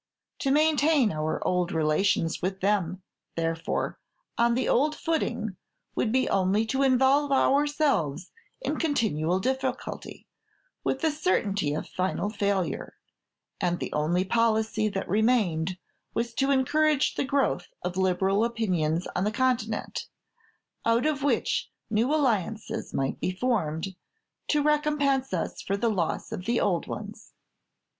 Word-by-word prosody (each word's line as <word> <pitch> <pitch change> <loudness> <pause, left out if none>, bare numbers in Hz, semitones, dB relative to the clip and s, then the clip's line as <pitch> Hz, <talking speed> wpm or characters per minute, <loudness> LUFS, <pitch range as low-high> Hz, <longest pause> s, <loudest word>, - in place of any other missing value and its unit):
To 275 - 0
maintain 300 -4 +4
our 155 0 -2
old 180 0 +1
relations 160 +1 +1
with 190 +1 -2
them, 190 -2 0 0.3
therefore, 165 0 -2 0.4
on 235 0 +3
the 255 - 0
old 300 +4 +2
footing, 235 - -2 0.4
would 220 - 0
be 260 +2 +2
only 195 +3 +2
to 265 - +1
involve 270 +2 +4
ourselves 275 - +2 0.3
in - - -2
continual 190 - +1
difficulty, 260 +3 -3 0.6
with 265 - -1
a 320 - +3
certainty 205 - 0
of - - -4
final 190 +3 -2
failure; 200 -3 -1 0.7
and 175 -2 0
the - - -4
only 170 +5 +1
policy 220 0 +1
that 195 -1 -4
remained 190 -5 +1 0.4
was 235 0 -1
to 270 +4 +1
encourage 295 +2 +2
the - - -1
growth 275 0 0 0.2
of 180 0 -3
liberal 190 +2 +2
opinions 180 -8 0
on - - +1
the 210 - +1
Continent, 230 -3 -1 0.8
out 230 +3 +2
of 300 -2 0
which 285 - 0 0.2
new 230 +5 +2
alliances 225 - 0
might 135 0 -2
be - - -1
formed, 185 -5 -1 0.5
to 295 -1 +2
recompense 295 -3 +1
us 180 -3 -3
for 200 - -1
the 230 +3 +1
loss 200 -5 -1
of 180 - -5
the 235 +2 +1
old 175 -4 0
ones. - - -8
220 Hz, 135 wpm, -27 LUFS, 185-270 Hz, 0.8 s, maintain